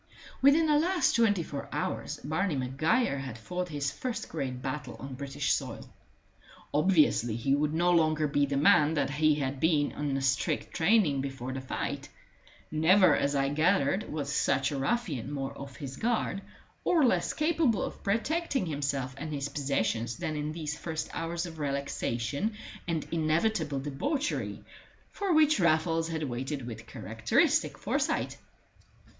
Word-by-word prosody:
Within 285 +4 +6
the 300 -1 +4
last 345 -3 +2
twenty 205 -6 +3
four 140 -3 -6
hours - - -3
Barney 160 +3 0
Maguire 140 - +1
had 130 -4 -6
fought 180 +10 -4
his 145 -3 -2
first 250 - -4
great 130 -5 -3
battle 130 -2 -4
on 135 +4 -8
British 140 +1 -1
soil. - - -4 0.9
Obviously, 145 - +3
he 120 +4 0
would 150 +1 +1
no 175 +2 +3
longer 155 -2 +3
be 145 0 +2
the 140 0 -1
man 150 +2 +5
that 140 -2 0
he 155 +1 +3
had 135 -2 -2
been 150 -2 +2
in 145 -2 -2
the 135 - -1
strict 135 -2 0
training 165 -6 +3
before 135 -2 -5
the 130 - -4
fight; 130 - -4 0.6
never, 165 +1 +5
as 140 +1 0
I 135 0 +2
gathered, 165 +4 +1
was 145 -2 -3
such 135 +1 +1
a 140 - -2
ruffian 145 - -1
more 135 -2 -4
off 140 -2 -9
his 135 +1 -7
guard, 225 -4 0 0.4
or 325 -6 +4
less 245 - +2
capable 305 -8 +2
of - - -6
protecting 270 - 0
himself 140 -4 -2
and 155 +2 -5
his 145 -1 -3
possessions, 120 -5 -1
than 155 - -3
in 150 0 -2
these 155 -2 -4
first 160 +1 -4
hours 165 +1 -2
of 165 -2 -9
relaxation 140 - -2 0.3
and 165 -3 -1
inevitable 160 -1 +1
debauchery 265 - -2 0.5
for 400 -2 -2
which 310 -5 +5
Raffles 165 -1 +2
had 160 -1 -3
waited 135 +1 -3
with 115 -1 -8
characteristic 110 -1 +1
foresight. - - -1
150 Hz, 155 wpm, -29 LUFS, 135-180 Hz, 0.9 s, Within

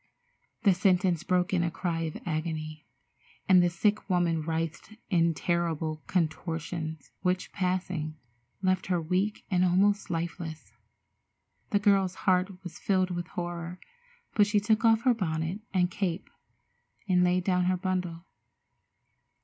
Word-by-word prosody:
The 200 -4 +6
sentence 180 -2 +2
broke 180 0 +1
in 180 - +3
a 170 - +1
cry 170 -1 -2
of 160 -2 -3
agony, 155 -2 -4 0.6
and 185 -2 +7
the 175 - +3
sick 205 +4 0
woman 175 -3 +2
writhed 165 +5 -3 0.2
in 170 -2 +3
terrible 165 -2 -1
contortions, 160 -2 -2
which, 180 0 0
passing, 180 -4 -2 0.5
left 185 -1 +1
her 180 -2 +1
weak 185 +6 -1
and 180 -1 +3
almost 195 +3 +3
lifeless. 165 -1 -4 1.0
The 205 - +3
girl's 195 -3 +3
heart 185 0 +1
was 175 -3 -8
filled 185 -2 +1
with 175 0 -3
horror, 175 0 -5 0.5
but 205 -1 +4
she 210 0 +3
took 215 +2 +1
off 225 0 +4
her 255 - +5
bonnet 165 -3 -2
and 180 -1 +2
cape 185 -1 -3 0.8
and 180 -2 +4
laid 180 0 +2
down 180 -1 +2
her 185 0 +2
bundle. 180 -2 -2
180 Hz, 135 wpm, -29 LUFS, 165-190 Hz, 1.0 s, and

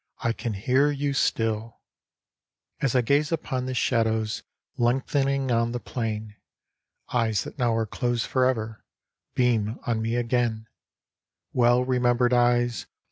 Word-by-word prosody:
I 115 - +1
can 115 -1 -4
hear 130 +8 +2
you 145 -1 -1
still! 115 -3 0 1.0
As 135 -2 0
I 125 - +5
gaze 145 +6 +2
upon 130 -6 -2
the 130 - -3
shadows 110 -2 0 0.3
Lengthening 135 +2 +1
on 115 0 +1
the 120 - -2
plain. 110 -3 -4 0.8
Eyes 115 -5 +1
that - - -10
now 120 -2 +2
are 115 0 +1
closed 120 +2 -1
for 130 -1 +1
ever 110 -4 -2 0.5
Beam 115 -3 +1
on 115 -2 0
me 115 +1 -1
again, 120 -2 0 0.4
— - - -58
Well 120 0 +4
remembered 125 -1 +2
eyes 120 -1 +2
120 Hz, 135 wpm, -26 LUFS, 115-130 Hz, 1.0 s, I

